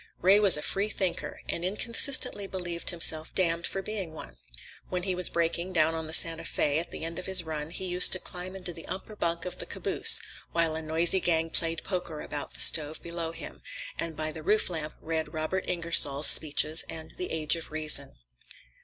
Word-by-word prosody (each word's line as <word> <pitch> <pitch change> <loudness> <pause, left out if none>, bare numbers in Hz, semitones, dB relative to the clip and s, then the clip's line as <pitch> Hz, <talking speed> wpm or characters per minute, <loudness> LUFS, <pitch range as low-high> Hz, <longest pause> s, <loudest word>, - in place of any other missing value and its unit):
Ray 195 +3 +4
was 200 -6 +5
a 150 - -5
freethinker, 195 -2 -3
and 170 - -5
inconsistently 225 +2 +2
believed 175 -3 -4
himself 160 -2 +2
damned 170 -2 +1
for 195 - -5
being 195 -6 -5
one. 65 - -10 0.6
When 180 -1 -3
he 190 0 -2
was 180 -1 +5
braking, 170 +2 -2
down 160 -1 +2
on 160 -1 -5
the - - -7
Santa 165 0 +4
Fé, 150 -2 -1
at 170 - -6
the - - -7
end 165 +1 -6
of 180 - -9
his 190 -2 +2
run 155 -1 -6
he 185 - -6
used 180 0 +5
to 185 - +3
climb 180 +1 -7
into 180 -2 -5
the 165 -1 -7
upper 190 +4 -7
bunk 170 -3 -3
of 180 - -6
the - - -3
caboose, - - +4 0.3
while 165 -1 +1
a 160 - -5
noisy 165 +4 +1
gang 165 -2 -1
played 165 0 -3
poker 180 -5 -5
about 145 -1 -7
the - - +4
stove 155 0 +5
below 170 -1 -5
him, - - -11 0.4
and 165 -2 -5
by 155 0 -4
the 155 - -9
roof 210 +3 0
lamp 155 -2 -5
read 160 0 -4
Robert 155 +4 -3
Ingersoll's 165 -4 +3
speeches 155 +1 +4
and 160 -1 -8
"The 180 - -7
Age 155 -1 +1
of 165 - -7
Reason." 155 - +1
170 Hz, 200 wpm, -27 LUFS, 160-180 Hz, 0.6 s, was